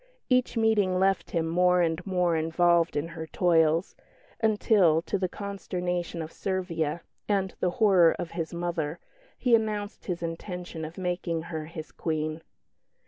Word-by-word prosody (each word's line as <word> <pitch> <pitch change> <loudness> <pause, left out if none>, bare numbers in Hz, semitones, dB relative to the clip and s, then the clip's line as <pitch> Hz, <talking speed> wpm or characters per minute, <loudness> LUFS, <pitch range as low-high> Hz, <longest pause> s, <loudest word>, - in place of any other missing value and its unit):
Each 255 -1 +2
meeting 210 -5 +3
left 190 0 +1
him 165 -1 -1
more 180 +1 +3
and 165 +1 -1
more 180 -3 +2
involved 170 +1 +2
in 155 +3 -2
her 160 -1 -7
toils, 165 0 +2 0.4
until, 205 -7 +3
to 200 - -2
the 185 -1 0
consternation 180 -4 -3
of 160 - -8
Servia 170 -4 -2 0.3
and 195 -2 +1
the 180 - +2
horror 185 -6 +5
of 175 -2 -5
his 165 -2 -4
mother, 170 -2 -2 0.4
he 245 - +1
announced 215 -2 0
his 175 -2 -3
intention 170 -1 -5
of 160 +2 -9
making 175 -3 -2
her 155 -1 -3
his 160 -1 -8
Queen. 155 0 -2
175 Hz, 145 wpm, -27 LUFS, 165-190 Hz, 0.4 s, horror